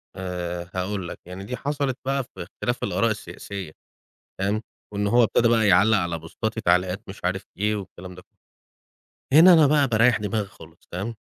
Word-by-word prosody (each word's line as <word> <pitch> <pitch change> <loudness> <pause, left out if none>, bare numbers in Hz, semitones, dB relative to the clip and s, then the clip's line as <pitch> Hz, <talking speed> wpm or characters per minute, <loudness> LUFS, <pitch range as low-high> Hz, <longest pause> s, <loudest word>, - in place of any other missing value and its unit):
آآ 90 -2 -5
هاقول 95 0 -2
لك، - - -8
يعني 90 +2 -8
دي 125 +5 -5
حصلت 140 -2 -2
بقى 135 0 0
في 120 - -10
اختلاف 120 +7 -4
الآراء 100 +4 +1
السياسية، 100 -4 -7 0.7
تمام، 105 +3 0 0.3
وإن 100 0 0
هو 120 +4 +4
ابتدى 115 +1 +3
بقى 115 -2 +3
يعلّق 100 +4 +5
على 85 -2 -2
بوستاتي 110 +8 -4
تعليقات 90 +1 +1
مش 95 - -9
عارف 95 +1 -1 0.2
إيه 105 +1 +1
والكلام 95 -2 -9
ده 90 - -12
كله. - - -48 1.0
هنا 180 +2 +9
أنا 160 -3 +6
بقى 145 -1 +3
باريح 115 +1 +4
دماغي 105 0 -2
خالص، 80 -3 -17
تمام، 100 +6 -4
100 Hz, 175 wpm, -24 LUFS, 90-115 Hz, 1.0 s, هنا